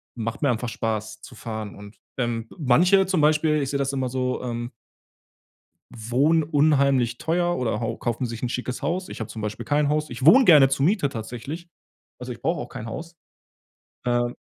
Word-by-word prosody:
macht 115 Hz, -1 st, -4 dB
mir 140 Hz, -, +3 dB
einfach 120 Hz, +1 st, -2 dB
Spaß 110 Hz, 0 st, -3 dB
zu -, -, -12 dB
fahren. 110 Hz, -3 st, -6 dB
Und, 100 Hz, 0 st, -12 dB, 0.2 s
ähm, 120 Hz, -2 st, -1 dB
m -, -, -13 dB
manche 175 Hz, +9 st, +4 dB
zum 185 Hz, -3 st, +1 dB
Beispiel, 150 Hz, 0 st, +3 dB
ich 135 Hz, -, -3 dB
sehe 140 Hz, -, -1 dB
das 140 Hz, 0 st, -1 dB
immer 130 Hz, -2 st, -1 dB
so, 125 Hz, 0 st, -2 dB
ähm 120 Hz, 0 st, -4 dB, 1.2 s
wohnen 135 Hz, +9 st, +2 dB
unheimlich 140 Hz, -5 st, +2 dB
teuer 175 Hz, 0 st, 0 dB
oder 120 Hz, -1 st, -1 dB
hau 115 Hz, 0 st, -2 dB
kaufen 120 Hz, +2 st, -2 dB
sich 115 Hz, -2 st, -6 dB
'n -, -, +1 dB
schickes 125 Hz, 0 st, -4 dB
Haus. 180 Hz, +2 st, -2 dB
Ich -, -, -8 dB
habe 110 Hz, -, -4 dB
zum 110 Hz, -, -7 dB
Beispiel 105 Hz, 0 st, -5 dB
kein 145 Hz, 0 st, +1 dB
Haus. 150 Hz, 0 st, 0 dB
Ich 120 Hz, +2 st, -5 dB
wohne 255 Hz, -, +8 dB
gerne 145 Hz, -6 st, +7 dB
zur 135 Hz, +1 st, +1 dB
Miete 185 Hz, -7 st, +2 dB
tatsächlich, 130 Hz, +9 st, -7 dB, 0.5 s
also, 125 Hz, 0 st, -6 dB
ich 120 Hz, -, -9 dB
brauche 165 Hz, +2 st, 0 dB
auch -, -, -7 dB
kein 120 Hz, -4 st, -7 dB
Haus. 165 Hz, +9 st, -7 dB, 0.9 s
Äh 120 Hz, 0 st, +1 dB
130 Hz, 195 wpm, -24 LUFS, 115-150 Hz, 1.2 s, wohne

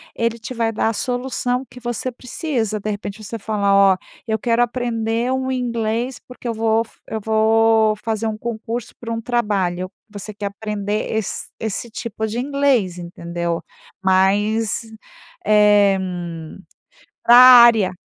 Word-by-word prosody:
ele 230 Hz, 0 st, -1 dB
te 225 Hz, +3 st, -7 dB
vai 230 Hz, -2 st, 0 dB
dar 220 Hz, -, 0 dB
a -, -, -2 dB
solução 250 Hz, +2 st, -2 dB
que 250 Hz, -, -12 dB
você 240 Hz, +1 st, -3 dB
precisa. 240 Hz, -, -3 dB
De 210 Hz, -, -4 dB
repente 205 Hz, +1 st, -5 dB
você 230 Hz, +3 st, -6 dB
fala: 200 Hz, -1 st, 0 dB, 0.2 s
"Ó, 185 Hz, -, -4 dB, 0.3 s
eu 220 Hz, 0 st, 0 dB
quero 235 Hz, +1 st, +1 dB
aprender 235 Hz, 0 st, -1 dB
um 260 Hz, 0 st, -1 dB
inglês, 235 Hz, -1 st, -2 dB
porque 250 Hz, -1 st, -9 dB
eu 230 Hz, -, -1 dB
vou 225 Hz, 0 st, +1 dB
f -, -, -25 dB
eu 220 Hz, -, -3 dB
vou 220 Hz, 0 st, +3 dB
fazer 225 Hz, 0 st, -1 dB
um 215 Hz, -1 st, -3 dB
concurso 230 Hz, +1 st, -5 dB
para 230 Hz, -1 st, -6 dB
um 230 Hz, -, -3 dB
trabalho." 195 Hz, -7 st, -1 dB, 0.2 s
Você 205 Hz, 0 st, -8 dB
quer 205 Hz, 0 st, -4 dB
aprender 210 Hz, 0 st, -3 dB
esse 220 Hz, -3 st, -3 dB
esse 220 Hz, +2 st, -4 dB
tipo 220 Hz, -1 st, -4 dB
de 220 Hz, +2 st, -3 dB
inglês, 265 Hz, -9 st, +1 dB
entendeu? 170 Hz, -1 st, -4 dB, 0.4 s
Mas 205 Hz, +5 st, +2 dB, 0.6 s
é 205 Hz, -2 st, +5 dB, 1.3 s
pra 240 Hz, -, +7 dB
área 235 Hz, -6 st, +8 dB
220 Hz, 145 wpm, -20 LUFS, 210-240 Hz, 1.3 s, área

